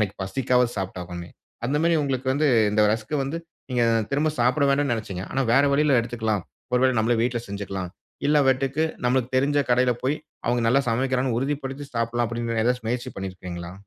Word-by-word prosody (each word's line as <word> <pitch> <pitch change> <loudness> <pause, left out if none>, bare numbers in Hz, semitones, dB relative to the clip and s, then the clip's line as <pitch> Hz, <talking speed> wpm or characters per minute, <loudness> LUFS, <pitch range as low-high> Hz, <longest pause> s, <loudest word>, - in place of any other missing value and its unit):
அன்னைக்கு 100 -2 0
பசிக்காகவாது 125 +3 +1
சாப்பிட்டு 95 -2 -4
ஆகணுமே. 85 0 -7 0.4
அந்த 140 - 0
மாரி 170 0 +3
உங்களுக்கு 130 -2 -2
வந்து 150 +2 +1 0.2
இந்த 105 +1 +2
ரஸ்க் 110 +6 -3
வந்து, 140 +5 -3 0.3
நீங்க 125 -1 +1 0.3
திரும்ப 150 +2 +1
சாப்பிட 130 +4 +3
வேண்டான்னு 140 -2 +2
நெனைச்சீங்க. 95 -5 -5
ஆனா 135 - +1
வேற 135 +3 +6
வழியில 140 -3 +4
எடுத்துக்கலாம். 110 -4 -2 0.3
"ஒரு 125 - +3
வேளை 130 -2 +3
நம்மளே 115 +1 +2
வீட்ல 120 -1 0
செஞ்சுக்கலாம். 95 -3 -5 0.4
இல்லை 150 0 +4
என்றால் 135 +3 +1 0.2
நம்மளுக்கு 125 0 +1
தெரிஞ்ச 145 +2 +2
கடையில 125 0 +4
போய் 135 +3 +1 0.3
அவங்க 120 0 +2
நல்லா 135 +3 +4
சமைக்கிறாங்கன்னு 130 0 0
உறுதிப்படுத்தி 140 0 -3
சாப்பிடலாம்." 115 +1 0
அப்படின்னு 115 -1 -2
ஏதாச்சு 125 0 0
முயற்சி 120 +1 -2
பண்ணிருக்கீங்களா? 90 -2 -6
125 Hz, 175 wpm, -24 LUFS, 110-135 Hz, 0.4 s, வேற